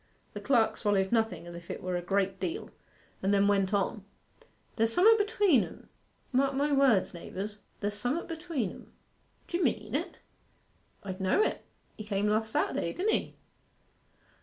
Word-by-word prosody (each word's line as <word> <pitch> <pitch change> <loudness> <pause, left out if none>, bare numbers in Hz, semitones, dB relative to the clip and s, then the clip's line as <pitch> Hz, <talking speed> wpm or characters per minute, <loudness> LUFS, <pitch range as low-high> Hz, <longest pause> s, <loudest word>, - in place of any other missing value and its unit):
The - - -6
clerk 235 -5 +2
swallowed 195 -3 +1
nothing 225 -6 0
as 175 0 -9
if 170 0 -11
it - - -4
were 180 0 -2
a 175 - -1
great 195 +1 0
deal, 350 +5 -4 0.5
and 195 - +1
then 200 0 +4
went 195 -1 +2
on, 205 0 0 0.7
'There's 225 0 +2
some'at 440 - +6
between 410 - +3
'em: - - -11 0.4
mark 270 +1 +2
my 290 +2 +1
words, 270 -8 +3
naibours 195 +4 -6 0.2
there's 205 0 -1
some'at 245 +10 -2
between 320 - -3
'em.' - - -14 0.5
'D'ye 345 +1 -2
mean 215 -7 0
it?' 335 +6 -2 0.9
'I 195 - -4
d' 185 - -8
know 190 - +3
it. - - -2 0.3
He 215 - -6
came 205 -1 -1
last 220 +1 +1
Saturday, 170 - 0
didn't 410 +4 0
he? - - -2
220 Hz, 165 wpm, -30 LUFS, 195-285 Hz, 0.9 s, some'at